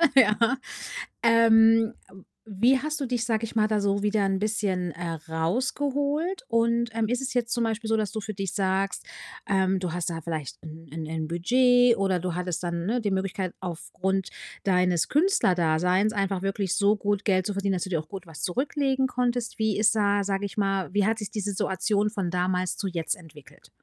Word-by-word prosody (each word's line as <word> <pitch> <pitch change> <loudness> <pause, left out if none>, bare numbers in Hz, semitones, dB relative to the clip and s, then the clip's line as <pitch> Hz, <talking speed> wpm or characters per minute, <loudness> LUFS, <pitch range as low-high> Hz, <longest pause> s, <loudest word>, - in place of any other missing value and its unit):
Ja, 230 +1 +4 0.6
ähm, 225 0 +5 0.5
wie 235 +7 +3
hast 305 +2 -3
du 275 - -1
dich, 240 -1 -1
sage 225 -1 0
ich 225 +1 -7
mal, 215 - +4
da 215 -1 0
so 200 0 0
wieder 210 -1 +2
'n 195 0 +1
bisschen, 200 -4 -1
äh, 170 -1 -4 0.2
rausgeholt? 280 - -1
Und, 235 0 +1
ähm, 225 -1 0
ist 245 +2 0
es 265 -1 -4
jetzt 240 -1 0
zum 235 - +1
Beispiel 225 0 -2
so, 225 - +2
dass 215 -1 -1
du 220 - -3
für 210 0 -6
dich 195 -2 -3
sagst, 195 -1 0 0.4
ähm, 190 -1 +2
du 180 -3 -3
hast 175 0 -2
da 165 -1 -4
vielleicht 155 -5 -5
'n 160 +1 -10
'n 160 - -5
'nen 160 0 -3
Budget 245 +7 +4
oder 190 -3 +1
du 180 -1 -3
hattest 180 -1 -3
dann, 170 0 -3
ne, 240 +4 0
die 210 -3 -1
Möglichkeit, 190 -1 -2
aufgrund 190 +2 -3 0.4
deines 180 -3 +2
Künstlerdaseins 185 - +2
einfach 195 -2 -1
wirklich 195 -1 -1
so 205 0 +4
gut 205 -1 -1
Geld 185 -2 +2
zu 205 - -1
verdienen, 200 0 0
dass 180 - -2
du 190 - -8
dir 170 - +1
auch 155 - -12
gut 190 -1 -8
was 160 -2 -9
zurücklegen 265 - 0
konntest? 245 -2 -1
Wie 220 -2 +1
ist 220 +1 +3
da, 205 -1 +2
sage 195 0 -1
ich 200 +3 -9
mal 195 -2 -1
wie 205 -1 +3
hat 225 0 +1
sich 210 - -5
diese 205 -1 -2
Situation 200 +2 0
von 195 -5 -2
damals 180 0 0
zu 200 - -3
jetzt 170 -3 -2
entwickelt? 160 -5 -16
200 Hz, 200 wpm, -26 LUFS, 180-230 Hz, 0.6 s, ähm